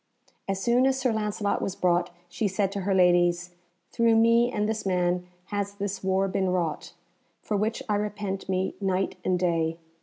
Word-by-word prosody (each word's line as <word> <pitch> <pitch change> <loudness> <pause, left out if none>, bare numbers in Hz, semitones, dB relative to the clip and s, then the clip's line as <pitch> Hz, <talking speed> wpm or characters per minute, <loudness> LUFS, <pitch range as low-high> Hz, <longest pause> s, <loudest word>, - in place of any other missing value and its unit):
As 195 -1 -1
soon 245 +5 +3
as 265 0 +1
Sir 255 -3 +1
Lancelot 210 -1 -1
was 195 - -2
brought, 175 -1 +1 0.2
she 180 +5 -1
said 195 0 0
to 200 - -3
her 195 +1 0
ladies, 175 -1 +3 0.4
"Through 230 -1 +3
me 230 +2 +4
and 210 -3 0
this 220 0 -2
man 180 -1 0 0.3
has 200 0 -2
this 200 -1 -4
war 190 +1 +1
been 190 0 0
wrought, 175 -4 -2 0.5
for 210 - -2
which 215 +3 -1
I 210 - +1
repent 205 -2 -4
me 185 0 0
night 190 -1 0
and 185 - +1
day. 165 -2 0
195 Hz, 180 wpm, -26 LUFS, 180-210 Hz, 0.5 s, me